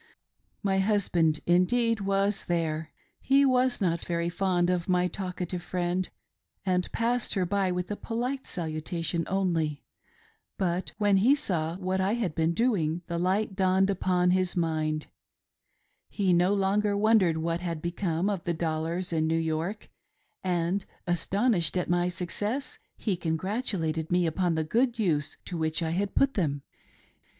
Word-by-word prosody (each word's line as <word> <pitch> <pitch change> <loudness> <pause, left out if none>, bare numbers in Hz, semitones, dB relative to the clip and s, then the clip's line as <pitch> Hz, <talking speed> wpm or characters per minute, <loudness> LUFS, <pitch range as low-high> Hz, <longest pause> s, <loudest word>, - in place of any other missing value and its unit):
My 195 -1 +2
husband, 180 -6 +2
indeed, 225 +6 +3
was 195 +1 0
.there. 160 -2 -1 0.3
He 275 +1 +4
was 255 -1 +2
not 170 -5 0
very 170 0 -1
fond 180 -1 +1
of 180 0 -1
my 180 0 +3
talkative 180 -1 -4
friend, 180 +1 -1 0.6
and 180 -1 0
ipassed 235 +1 0
her 190 -2 +1
by 195 0 +1
with 180 +2 -3
a - - -1
polite 250 +5 -3
salutation 165 0 -3
only; 170 -6 0 0.7
but 180 -1 -1
when 205 -2 +3
he 240 +9 +5
saw 170 - -2
what 190 0 -1
I 195 +4 +1
had 215 -9 -1
been 165 +1 +1
doing 175 -8 +1
the 170 0 -3
light 190 +3 0
dawned 190 0 +3
upon 180 -1 +2
his 185 -1 +1
mind 155 -2 0 0.5
— - - -46
he 195 -3 +1
no 175 +2 +4
longer 200 +1 +1
wondered 205 -6 +4
what 165 +1 -1
had 170 -3 -3
become 170 +1 -1
of 200 -4 -1
the 170 - -1
dollars 165 +2 -2
in 160 -1 +1
New 165 +1 +1
York, 165 +5 -2 0.6
and 180 +1 0
— - - -38
astonished 180 - +1
at 180 - -1
my 175 0 +2
success'— 205 +9 -3 0.2
he 205 -5 -1
congratulated 165 -1 -2
me 180 0 +3
upon 170 +1 +1
the 160 - +1
good 235 +8 +1
use 155 -9 0
to 175 - -4
which 160 +1 0
I 160 - -1
had 195 +4 -1
put 275 0 +3
them. 145 - -1
180 Hz, 155 wpm, -28 LUFS, 165-200 Hz, 0.7 s, he